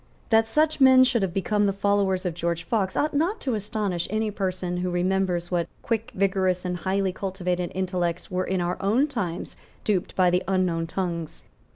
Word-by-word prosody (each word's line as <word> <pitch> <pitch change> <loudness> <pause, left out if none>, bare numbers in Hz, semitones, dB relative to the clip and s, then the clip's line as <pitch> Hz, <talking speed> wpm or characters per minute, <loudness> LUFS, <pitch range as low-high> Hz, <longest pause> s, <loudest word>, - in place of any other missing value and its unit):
That 225 0 +5
such 305 +4 +1
men 260 -1 +8
should 245 -3 +2
have 190 -2 0
become 205 +3 +1
the - - +2
followers 200 -1 +1
of 180 - -1
George 170 0 -2
Fox 195 0 -1
ought 300 - +1
not 340 +9 +1
to 260 - -1
astonish 205 -4 -2
any 215 +1 -1
person 185 -3 -2
who 180 +1 -1
remembers 180 -1 0
what 170 -2 0
quick, 230 +1 -2
vigorous 185 -2 +1
and 180 0 -2
highly 190 +1 0
cultivated 180 -2 -2
intellects 180 -2 -2
were 185 0 0
in 185 -1 -1
our 175 +1 -2
own 220 +8 +3
times 200 - -4 0.3
duped 200 -2 -1
by 180 -1 +4
the 180 +1 +1
unknown 180 -3 +1
tongues. 170 -3 -4
190 Hz, 185 wpm, -25 LUFS, 180-210 Hz, 0.3 s, men